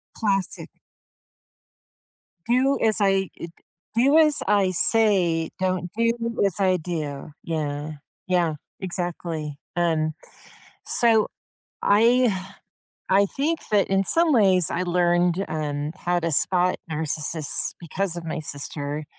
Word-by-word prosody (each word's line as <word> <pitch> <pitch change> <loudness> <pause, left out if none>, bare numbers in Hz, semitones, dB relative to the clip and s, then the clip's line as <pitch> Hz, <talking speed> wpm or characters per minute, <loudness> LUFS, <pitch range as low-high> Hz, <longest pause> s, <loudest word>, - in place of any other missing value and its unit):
Classic. 195 -4 -1 1.8
Do 265 +3 +2
as 220 -1 +3
I 195 -1 +2
d 170 - -7 0.4
do 270 +7 +4
as 305 -2 +4
I 195 -2 +3
say, 180 -5 +2
don't 185 -2 -1
do 230 0 +2 0.3
as 195 - -1
I 185 -2 +2
do. 155 -4 -5
Yeah. 150 -2 -3 0.3
Yeah, 175 -4 +1 0.3
exactly, 170 -5 -4 0.2
and 160 -2 0 0.7
So 225 -3 +3 0.6
I 220 -3 +3 0.6
I 200 +1 +4
think 305 - -1
that 205 -2 +3
in 195 0 +1
some 330 - +3
ways, 190 - +3
I 180 - -1
learned, 175 +1 +1
um, 150 -1 -3
how 175 0 -1
to 165 - -1
spot 180 +4 +2 0.2
narcissists 155 0 0
because 175 +2 -2
of 170 - -9
my 160 0 -3
sister, 145 0 -3
180 Hz, 115 wpm, -23 LUFS, 160-200 Hz, 1.8 s, do